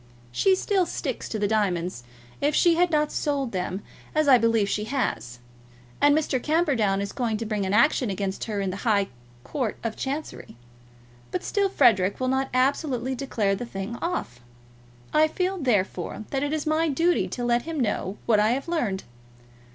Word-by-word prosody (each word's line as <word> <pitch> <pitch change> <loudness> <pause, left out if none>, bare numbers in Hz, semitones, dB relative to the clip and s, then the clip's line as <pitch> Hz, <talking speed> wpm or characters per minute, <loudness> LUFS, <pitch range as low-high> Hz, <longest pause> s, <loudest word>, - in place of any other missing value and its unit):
She 380 - +3
still 375 -2 +1
sticks 265 -6 -4
to 220 - -3
the 205 -1 +1
diamonds, 185 - 0 0.4
if 290 +1 +2
she 345 - +5
has 350 +2 +3
not 300 -2 +1
sold 280 -4 -1
them, 185 +1 -3 0.3
as 310 -1 +2
I 260 -3 +7
believe 230 -2 +2
she 210 +1 -1
has; 120 - -2 0.6
and 290 +1 +5
Mr. 275 -5 0
Camperdown 265 - +1
is 200 - -3
going 230 -4 -1
to 225 - -4
bring 210 -3 -1
an 190 - -1
action 240 0 +3
against 195 0 -3
her 210 -3 -2
in 195 -1 -1
the 190 - -5
High 200 -3 +1 0.3
Court 245 - -3
of 230 -1 -2
Chancery. 280 - -5 0.7
But 180 - -3
still 400 -1 +1
Frederic 205 - +3
will 255 0 0
not 265 +1 0
absolutely 260 -1 +1
declare 235 -7 -1
the 195 - -3
thing 205 -1 -5
off. 230 - -3 0.7
I 310 +1 +5
feel, 370 +4 -2
therefore, 210 - -1
that 270 - 0
it 290 0 -1
is 310 -1 -2
my 315 +1 +2
duty 335 +5 +2
to 245 - -5
let 240 0 +2
him 320 +1 -5
know 205 -4 -1
what 220 -3 +4
I 215 +2 +3
have 270 +5 -3
learned. 240 - -1
245 Hz, 180 wpm, -25 LUFS, 205-300 Hz, 0.7 s, I